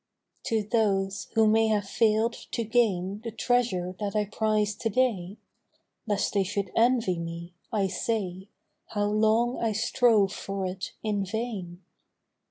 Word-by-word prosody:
TO 220 -2 0
those 200 -2 0
who 220 0 +5
may 220 +1 +4
have 210 -2 0
fail'd 220 +2 +2
to 235 - -5
gain 205 -4 +1
The 235 - -3
treasure 220 -6 0
that 205 -1 -3
I 210 -1 +2
prize 215 0 0
to 225 - -1
day, 215 -5 0 0.7
(Lest 205 -2 0
they 200 -1 +3
should 195 0 -3
envy 225 -7 +3
me), 170 +1 -6 0.2
I 205 -3 +1
say 190 -1 -2 0.4
How 205 -1 -1
long 220 +4 +2
I 225 -2 0
strove 220 -2 +3
for 195 -1 -4
it 185 +1 -5
in 210 -2 0
vain. 195 -4 -5
210 Hz, 145 wpm, -27 LUFS, 195-225 Hz, 0.7 s, who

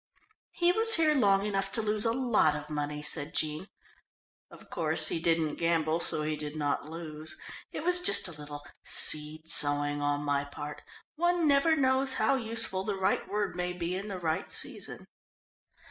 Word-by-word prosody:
"He 350 0 +1
was 450 +4 +4
here 315 -2 +3
long 200 -7 +2
enough 195 -1 -2
to 225 - +3
lose 215 0 +1
a 230 - +2
lot 235 - +1
of 150 +1 -8
money," 150 0 -4
said 145 -1 0
Jean. 155 +4 -2 0.8
"Of - - -16
course 155 -3 0
he - - -2
didn't 165 -2 0
gamble, 165 -1 0
so 155 -2 +2
he 155 0 -2
did 150 0 -6
not 145 0 -3
lose. 160 -1 -5 0.3
It - - -6
was 360 +1 +5
just 380 - +4
a - - -7
little 145 -2 -10 0.2
seed 155 +1 +1
sowing 145 -1 +1
on 145 0 -1
my 145 -1 -1
part 145 +1 -9 0.4
one 345 0 +1
never 285 +3 +3
knows 265 -1 +3
how 275 - +1
useful 225 -6 +3
the 200 0 -3
right 190 - -1
word 205 -2 -2
may 180 0 -3
be 175 0 -4
in 195 +3 -5
the 195 -3 -5
right 165 +1 -3
season." - - -2
170 Hz, 175 wpm, -29 LUFS, 150-230 Hz, 0.8 s, was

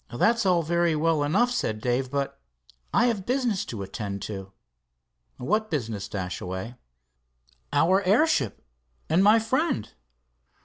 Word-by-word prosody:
"That's 220 - +2
all 175 -2 +3
very 170 0 +1
well 160 0 +2
enough," 205 +12 +2
said 110 - -1
Dave, 125 +3 -1
"but 140 - -3 0.5
I - - +3
have 225 -6 0
business 245 -4 0
to 105 -4 -5
attend 100 0 -5
to." 95 -2 -6 0.9
"What 215 - 0
business, 110 -9 -3
Dashaway?" 95 +3 -5 1.0
"Our 185 +4 +3
airship 195 - +2 0.4
and 170 +5 +4
my 210 +3 +7
friend." 240 - -1
160 Hz, 125 wpm, -26 LUFS, -, 1.0 s, my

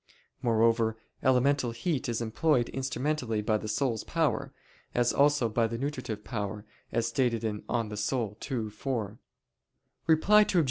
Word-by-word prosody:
Moreover, 115 -1 +2 0.2
elemental 130 0 +3
heat 125 +4 -2
is 115 0 -1
employed 120 +2 +1
instrumentally 130 -3 -1
by 110 0 +1
the 110 - -6
soul's 115 +1 0
power, - - 0 0.4
as 120 0 +3
also 145 -3 +4
by 115 +1 +1
the 115 +1 -4
nutritive 130 -6 -4
power, 105 -2 -4 0.3
as 115 0 +1
stated 120 -2 +1
(De 105 -2 -2
Anima 110 -3 -1 0.6
ii, 115 -4 -1
4). 110 -2 -3 0.9
Reply 185 +7 +6
Obj. 210 -2 +1
115 Hz, 135 wpm, -29 LUFS, 110-135 Hz, 0.9 s, Reply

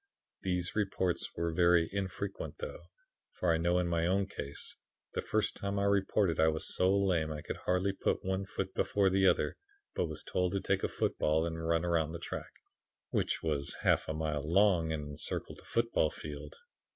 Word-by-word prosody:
These 90 -1 -1
reports 95 -4 0
were 85 0 -1
very 85 0 +4
infrequent 100 0 -3
though, 485 +2 -7 0.5
for 85 -2 +1
I - - +2
know 85 +2 +2
in 90 -1 +1
my 85 -1 +1
own 95 +2 +2
case, 70 -7 -6 0.4
the - - -1
first - - 0
time 100 0 -3
I 100 - +1
reported, 100 -2 +2
I 80 - +6
was 80 0 0
so 90 +1 +3
lame 90 -6 +1
I 75 -1 -5
could - - -4
hardly 90 +2 +2
put 95 - -1
one 95 +1 -1
foot 95 -1 -4
before 100 -2 +2
the 95 0 +4
other, - - +2 0.4
but 90 - 0
was 80 -1 -6
told 90 0 0
to 100 - +1
take - - 0
a - - +3
football 80 +2 +1
and 80 -1 -4
run 85 +1 +1
around 80 -2 +1
the - - -3
track, 85 - -5 0.6
which - - 0
was 75 -3 -1
a - - -11
half - - +3
mile 80 -2 -1
long 90 -4 +4
and 75 -2 -3
encircled 70 -1 -1
the - - -17
football 115 -9 +1
field. 75 -1 -8
90 Hz, 190 wpm, -32 LUFS, 80-95 Hz, 0.6 s, I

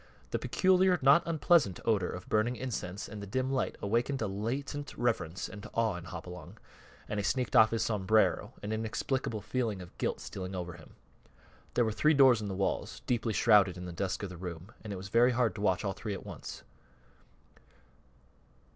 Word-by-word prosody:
The - - 0
peculiar, 185 -1 +3
not 140 +5 +7
unpleasant 160 - +3
odor 105 -5 +2
of 90 - -7
burning 110 +3 +1
incense 105 -7 -4
and 105 -1 -8
the 100 - -7
dim 130 +6 -1
light 135 - 0
awakened 120 +6 0
a - - +1
latent 130 +8 -4
reverence 95 -8 -1
and 105 -2 -9
awe 115 -4 +1
in 90 -1 -7
Hopalong, 90 -2 -9 0.5
and 105 - -2
he - - -1
sneaked 125 +3 0
off 110 -1 +8
his 115 - 0
sombrero, 110 0 +2
an 105 - -3
inexplicable 110 +1 -2
feeling 110 -2 -2
of 90 -1 -11
guilt - - -1
stealing 95 0 -6
over 90 -1 -4
him. 85 -2 -15 0.8
There 120 - +4
were 110 - 0
three 155 +8 +3
doors 130 -5 +6
in 105 - -4
the 95 - -3
walls, 95 +1 -2
deeply 115 -2 0
shrouded 105 -5 +5
in 90 - -6
the 90 - -6
dusk 95 +3 -2
of 100 - -3
the 90 - -8
room, 90 +2 -7
and 105 - -6
it - - -3
was 95 +2 -7
very 120 +3 +4
hard 120 -2 +2
to 100 - -7
watch 100 0 +1
all 95 - 0
three 105 -1 -4
at - - -9
once. - - -8
110 Hz, 190 wpm, -31 LUFS, 95-125 Hz, 0.8 s, off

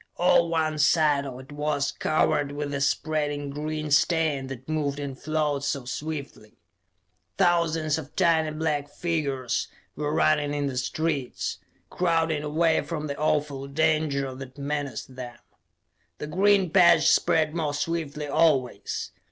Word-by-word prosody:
All 170 -1 +4
one 155 -2 0
side 150 -2 +3
of 130 -1 -7
it 130 - -15
was 145 -1 -1
covered 145 -1 +1
with 145 0 -4
the 140 -1 -2
spreading 145 0 -1
green 155 +1 -4
stain 150 -2 +2
that 130 -1 -8
moved 150 -3 -1
and 140 -2 -5
flowed 150 -1 -1
so 140 -2 -2
swiftly. 140 -5 -6 0.8
Thousands 165 -4 +2
of 145 -2 -10
tiny 165 -4 +3
black 155 -2 -2
figures 140 -7 -2 0.3
were 150 0 -2
running 150 -2 +2
in 145 -1 -1
the 135 -2 -3
streets, 140 0 -2 0.3
crowding 165 -3 +1
away 160 +2 +2
from 155 -3 -4
the 140 -1 -3
awful 145 -2 -1
danger 150 -2 0
that 130 +1 -10
menaced 140 -3 -4
them. 125 -2 -8 0.8
The - - -5
green 190 +2 +3
patch 170 -3 +6
spread 155 -1 +3
more 155 -4 -1
swiftly 150 -1 -3
always. 140 -4 +1
150 Hz, 135 wpm, -26 LUFS, 140-160 Hz, 0.8 s, patch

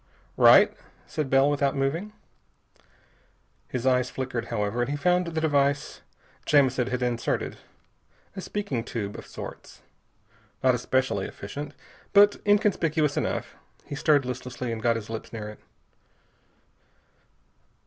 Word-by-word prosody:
"Right," - - +7 0.3
said 150 -4 -3
Bell 135 +1 +5
without 145 -1 +1
moving. 155 +10 -1 1.6
His 125 -1 -4
eyes 125 -1 +3
flickered, 125 -3 -4
however, 110 0 -1
and 120 - -1
he 145 - -1
found 180 +3 +2
the 160 -1 -2
device 145 -2 +1 0.5
Jamison 130 -4 +3
had 125 0 -2
inserted. 120 -1 -1 0.8
A 190 - -5
speaking 185 - -3
tube 105 -4 -4
of - - -9
sorts. - - -10 0.8
Not 130 -1 +5
especially 125 -4 0
efficient, 140 +8 -7 0.4
but 205 0 +6
inconspicuous 170 -8 +2
enough. - - -2 0.3
He - - -8
stirred 145 -1 +3
listlessly 125 -1 -4
and 115 -1 -4
got 115 0 +2
his 115 -1 -6
lips 110 - -6
near 110 -2 -6
it. 105 - -11
130 Hz, 125 wpm, -26 LUFS, 120-150 Hz, 1.6 s, Right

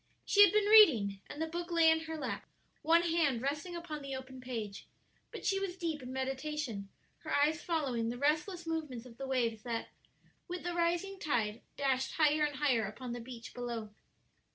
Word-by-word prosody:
She 410 - +5
had 405 - +6
been 425 0 +3
reading, 250 - +6
and 290 - -8
the 320 - 0
book 340 +2 -5
lay 330 -2 +5
in 320 0 0
her 320 0 -5
lap, 300 - -4 0.3
one 335 +2 +4
hand 325 -7 +2
resting 300 +6 -2
upon 330 -3 -6
the 275 -1 -5
open 260 0 -8
page; 225 -6 -5 0.4
but - - -8
she 390 0 +2
was 380 -2 -4
deep 325 -5 -3
in 250 0 -7
meditation, 265 -5 -3 0.3
her - - -7
eyes 300 +3 +2
following 265 -9 -1
the 240 - -4
restless 310 +6 0
movements 305 -7 -4
of 235 -2 -13
the 270 - -4
waves 235 -4 0
that, 230 -1 -4 0.6
with 360 0 -5
the 350 0 -2
rising 345 +3 0
tide, 230 -7 -1 0.2
dashed 265 -2 0
higher 305 -1 +3
and 295 -1 0
higher 255 -7 +2
upon 240 +4 -7
the 240 0 -4
beach 230 -1 -9
below. 235 -3 -5
290 Hz, 190 wpm, -33 LUFS, 245-330 Hz, 0.6 s, had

